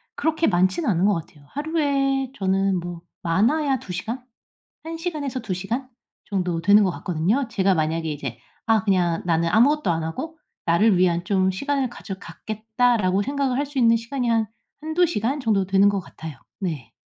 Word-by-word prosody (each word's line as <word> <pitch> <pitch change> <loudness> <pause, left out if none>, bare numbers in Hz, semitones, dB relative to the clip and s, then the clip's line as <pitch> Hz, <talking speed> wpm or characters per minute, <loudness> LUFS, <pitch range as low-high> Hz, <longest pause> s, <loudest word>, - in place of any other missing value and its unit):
그렇게 320 +2 +1
많지는 180 -1 +2
않은 180 -1 +2
것 205 - +4
같아요. 150 -3 -8
하루에 275 -3 0
저는 195 -1 +1
뭐 175 -1 -7 0.2
많아야 260 - +2
2 180 - -9
시간? 230 +8 -4 0.6
1 325 +1 -5
시간에서 300 -7 -3
2 205 -5 -3
시간 235 +8 -3 0.4
정도 180 -4 -1
되는 205 +4 +6
것 185 - +2
같거든요. 185 - 0
제가 195 -2 +2
만약에 160 0 0
이제 135 -5 -5 0.3
'아 220 -3 +3
그냥 180 -5 +2
나는 165 -1 +2
아무것도 240 - +4
안 165 -1 -1
하고 315 - -5 0.3
나를 185 +4 +4
위한 175 -1 +2
좀 190 -1 +2
시간을 275 +6 -1
가져 210 -4 -7
갖겠다.'라고 220 -3 0
생각을 275 0 -1
할 290 - +1
수 280 -1 -4
있는 230 -1 +5
시간이 240 +1 -2
한 225 -1 +2 0.3
1-2 315 +3 +2
시간 270 -1 -1
정도 205 -5 +2
되는 195 +1 +4
것 200 -1 0
같아요. 160 -5 -9 0.2
네. 160 - -4
205 Hz, 330 characters per minute, -23 LUFS, 180-270 Hz, 0.6 s, 되는